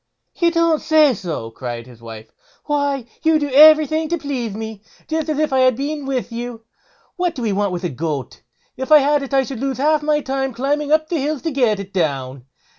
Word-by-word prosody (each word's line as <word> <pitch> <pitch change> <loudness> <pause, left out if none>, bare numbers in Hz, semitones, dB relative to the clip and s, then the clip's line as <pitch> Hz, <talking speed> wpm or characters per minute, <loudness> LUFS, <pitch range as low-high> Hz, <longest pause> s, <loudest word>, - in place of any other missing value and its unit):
"You 340 -1 +2
don't 335 -2 +1
say 310 -3 +4
so!" 160 - -5
cried 120 -1 -6
his 120 -2 -16
wife; 110 -1 -10 0.3
"why, 285 -4 -1 0.2
you 320 0 +3
do 290 -2 -2
everything 310 +2 +6
to 340 - 0
please 255 -8 -4
me, 220 -1 -7 0.3
just 315 0 -2
as 305 - -1
if 305 -2 0
I 265 - +3
had 255 -1 +4
been 285 +2 -4
with 255 -3 -2
you; 235 0 -6 0.6
what 355 -2 -1
do 250 - -5
we 215 -3 0
want 200 0 0
with 180 0 -4
a 175 - -1
goat? 145 -1 -5 0.3
If 265 +3 -6
I 305 - +10
had 290 0 +2
it 275 - -7
I 270 -1 +3
should 260 -2 -7
lose 270 -1 -2
half 300 +3 +2
my 300 0 +1
time 270 -1 -2
in - - -11
climbing 290 +4 -1
up 310 0 +3
the 335 - -1
hills 295 +1 -2
to 325 - -1
get 240 -7 +1
it 195 0 -8
down. 135 -7 -2
270 Hz, 225 wpm, -19 LUFS, 205-305 Hz, 0.6 s, I